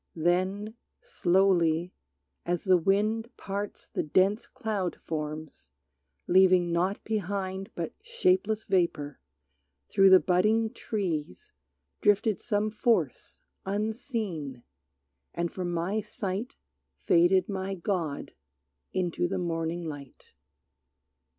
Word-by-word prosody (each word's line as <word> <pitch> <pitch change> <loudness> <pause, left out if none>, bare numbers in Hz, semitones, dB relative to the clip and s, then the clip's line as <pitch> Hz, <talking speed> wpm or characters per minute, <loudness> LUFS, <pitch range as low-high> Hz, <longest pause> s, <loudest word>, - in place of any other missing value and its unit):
Then, 185 +6 0 0.3
slowly, 175 -2 +2 0.5
as 175 0 -1
the 185 -2 +5
wind 215 +6 +1
Parts 200 +1 -5
the - - -2
dense 195 +9 +2
cloud 215 -8 -3
forms, 155 - -6 0.6
leaving 185 -1 +5
naught 180 +4 0
behind 195 -2 -3
But - - -4
shapeless 370 - +1
vapor, 160 -6 0 0.7
through 195 0 +6
the 190 0 +9
budding 215 +6 +2
trees 195 - -4 0.5
Drifted 205 0 +3
some 215 -1 0
force 215 - 0 0.2
unseen, 200 - -3 0.7
and 170 0 -1
from 180 -2 -3
my 175 +6 -1
sight 205 +1 -4 0.4
Faded 175 - +4
my 195 -1 -3
god 170 -5 -3 0.6
into 175 -1 0
the 190 +2 -2
morning 170 -1 -2
light. 145 -4 -9
190 Hz, 100 wpm, -28 LUFS, 170-210 Hz, 0.7 s, the